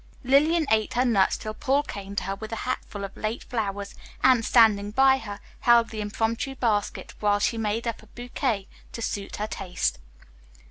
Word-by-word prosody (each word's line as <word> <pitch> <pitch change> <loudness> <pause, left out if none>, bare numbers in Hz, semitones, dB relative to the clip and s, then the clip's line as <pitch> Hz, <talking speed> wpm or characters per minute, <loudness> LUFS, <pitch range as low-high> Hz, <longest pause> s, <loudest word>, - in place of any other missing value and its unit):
Lillian 305 +6 +4
ate 220 +1 +2
her 250 +2 +3
nuts 205 -6 +3
till 215 - -5
Paul 275 +5 +1
came 200 -6 -7
to - - -1
her 195 +2 -2
with 220 +3 -8
a - - -2
hatful 205 -5 -4
of 195 - -6
late 215 +2 -3
flowers 205 -4 -3 0.3
and, 255 -3 +5
standing 215 -4 +4
by 265 +4 +4
her, 205 -3 -7 0.2
held 235 -1 +4
the 215 -1 -4
impromptu 225 +5 -2
basket 215 -5 -1
while 205 -1 +3
she 205 +3 0
made 225 +2 -1
up 230 - -3
a 220 - -18
bouquet 240 -3 -3 0.3
to 230 - -6
suit 200 -2 -3
her 210 - -2
taste. 180 - -2
220 Hz, 185 wpm, -26 LUFS, 205-245 Hz, 0.3 s, and